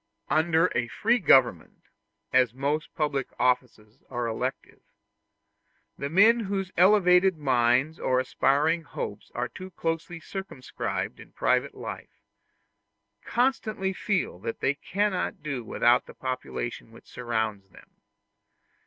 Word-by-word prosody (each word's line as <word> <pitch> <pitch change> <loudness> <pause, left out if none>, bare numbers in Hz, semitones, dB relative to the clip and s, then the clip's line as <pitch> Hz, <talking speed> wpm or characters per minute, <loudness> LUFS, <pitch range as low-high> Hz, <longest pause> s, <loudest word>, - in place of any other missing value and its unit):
Under 160 +2 +3
a 125 -1 0
free 230 - +1
government, 130 - +3 0.5
as 125 -2 +3
most 145 +4 -2
public 145 -4 -1
offices 125 -4 -1
are 120 -2 -3
elective, 115 -1 -4 1.1
the 140 - -4
men 215 +8 +5
whose 195 -1 -3
elevated 185 -1 +5
minds 130 +1 +2
or 130 0 +1
aspiring 145 +5 +1
hopes 105 -8 -7
are 120 +1 -1
too 185 +9 -10
closely 165 -1 -3
circumscribed 190 -7 -5
in - - -14
private - - +1
life, - - -9 1.0
constantly 220 -6 0
feel 185 - -2
that 115 +3 -5
they 135 - +1
cannot 190 +2 -2
do 140 -5 -3
without 120 +2 +2
the - - -12
population 130 -3 -5
which 115 - -16
surrounds 110 -5 -3
them. - - -18
145 Hz, 120 wpm, -27 LUFS, 125-185 Hz, 1.1 s, men